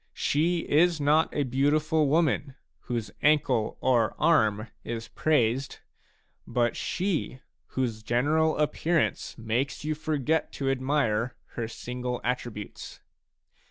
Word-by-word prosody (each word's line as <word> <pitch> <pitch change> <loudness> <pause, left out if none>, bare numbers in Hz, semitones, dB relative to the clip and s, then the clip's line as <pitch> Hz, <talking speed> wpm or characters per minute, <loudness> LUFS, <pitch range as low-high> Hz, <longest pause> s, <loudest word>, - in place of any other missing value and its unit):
She 165 +4 +1
is 165 +2 +3
not 150 +3 +3
a 145 - 0
beautiful 150 +4 +2
woman 145 -2 +1 0.2
whose 115 -4 -4
ankle 135 -7 +2
or 120 -4 +2
arm 110 -10 +3 0.2
is 115 -1 -5
praised, 135 -3 +1 0.7
but 120 -1 +1
she 175 -8 -2 0.3
whose 120 -4 -2
general 150 +8 +1
appearance 160 +2 0
makes 120 +6 -2
you 155 - 0
forget 155 0 -1
to 135 -1 -1
admire 130 -4 0
her 115 -2 -4
single 125 +2 -4
attributes. 120 -4 -5
135 Hz, 110 wpm, -27 LUFS, 120-155 Hz, 0.7 s, is